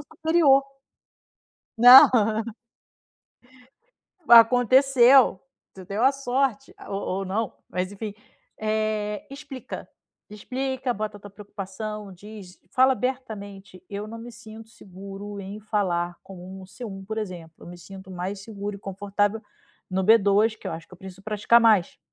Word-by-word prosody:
o 305 +2 -16
superior. 275 -5 +3 1.0
Não. 245 +3 +10 2.2
Aconteceu, 245 0 +6 0.3
você 190 -1 -11
deu 200 +5 -4
a 270 +2 +5
sorte, 270 -4 -2
a - - -12
ou 195 - -3 0.2
ou 195 - -3
não, 205 +3 -3 0.2
mas 185 +2 -3
enfim. 205 0 -7 0.4
Eh, 215 -1 -2
explica. 275 -2 -9 0.4
Explica, 255 +4 -4
bota 210 0 -5
a - - -23
tua 205 - -12
preocupação, 205 0 -8
diz, 200 -1 -13
fala 260 +3 +4
abertamente: 205 -8 -6
"Eu 205 +1 -5
não 230 +1 -9
me 235 +1 -10
sinto 225 -1 -13
seguro 200 +1 -10
em 200 +2 -8
falar 175 -5 -2
com 195 - -12 0.3
um - - -10
C1, 195 -3 -9
por 220 +2 -5
exemplo. 175 -6 -7
Eu - - -14
me 175 0 -10
sinto 190 +2 -12
mais 185 +2 -5
seguro 205 -1 -6
e - - -13
confortável 205 +2 -2 0.5
no 190 +1 -1
B2, 215 +1 +3
que - - -11
eu - - -4
acho 165 0 -8
que 185 - -14
eu - - -19
preciso 190 0 -12
praticar 215 +3 +3
mais". 215 -6 +3
210 Hz, 145 wpm, -24 LUFS, 195-235 Hz, 2.2 s, Não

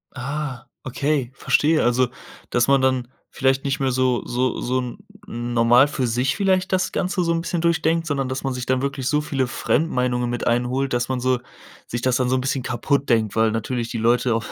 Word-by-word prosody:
Ah, 135 -1 -4 0.2
okay, 135 -1 -1
verstehe. 155 +3 +2
Also, 120 +1 +3 0.4
dass 120 -1 +2
man 135 -1 +4
dann 130 -2 +1 0.2
vielleicht 135 0 +1
nicht 140 0 -1
mehr 135 -1 +1
so 130 -1 +1
so 125 0 -1
so 125 +1 0
'n 125 +4 -5 0.3
normal 120 - +3
für 145 -3 -2
sich 125 +3 0
vielleicht 190 -2 +1
das 185 0 +1
Ganze 185 -1 -1
so 170 - +1
'n 165 - -1
bisschen 170 -1 -2
durchdenkt, 165 0 +1
sondern 140 -4 -1
dass 130 +1 -4
man 135 -1 -1
sich 125 0 -5
dann 130 +1 +1
wirklich 135 -2 -2
so 150 0 +2
viele 135 -3 -1
Fremdmeinungen 125 -4 0
mit 120 -1 -3
einholt, 125 +3 0
dass 120 +1 0
man 130 -1 -1
so 130 0 +1 0.5
sich 120 0 -4
das 130 -1 +2
dann 125 -1 0
so 130 - +2
'n 130 - 0
bisschen 135 0 -1
kaputt 140 +4 -1
denkt, 110 -3 +2
weil 110 0 +3
natürlich 115 +2 -2
die 115 - -4
Leute 120 +1 +2
auf 115 - -3
130 Hz, 210 wpm, -22 LUFS, 120-140 Hz, 0.5 s, man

